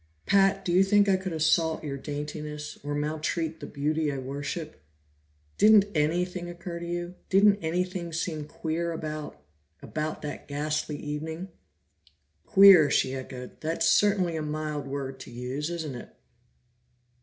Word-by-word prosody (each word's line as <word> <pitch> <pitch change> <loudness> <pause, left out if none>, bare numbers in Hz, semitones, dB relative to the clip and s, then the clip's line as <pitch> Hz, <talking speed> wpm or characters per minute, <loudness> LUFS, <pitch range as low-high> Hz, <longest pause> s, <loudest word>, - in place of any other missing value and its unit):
"Pat, 195 0 +3
do 175 - 0
you 185 +2 +6
think 205 +1 +4
I 195 - +4
could 185 0 -4
assault 160 0 +2
your 140 -2 -3
daintiness, 150 +1 -6
or 145 0 -3
maltreat 155 +2 -2
the - - -7
beauty 150 +1 -1
I 140 - -4
worship? 140 - -5 0.8
Didn't 210 -1 +7
anything 175 +3 0
occur 175 0 -6
to 170 - -6
you? 175 +1 -4 0.2
Didn't 200 +1 +5
anything 175 +1 -2
seem 160 -2 -3
queer 165 +2 -3
about 155 - -6 0.4
about 155 - -4
that 145 -1 -6
ghastly 150 +1 -2
evening?" 160 +5 -5 1.0
"Queer!" 190 -6 +8
she 130 - +2
echoed. 130 -1 -8
"That's 160 +2 0
certainly 195 -5 +3
a 160 - -2
mild 150 -1 -3
word 135 -1 -5
to - - -10
use, 125 +6 -4
isn't 160 -5 -4
it?" 120 - -8
155 Hz, 145 wpm, -27 LUFS, 150-175 Hz, 1.0 s, Queer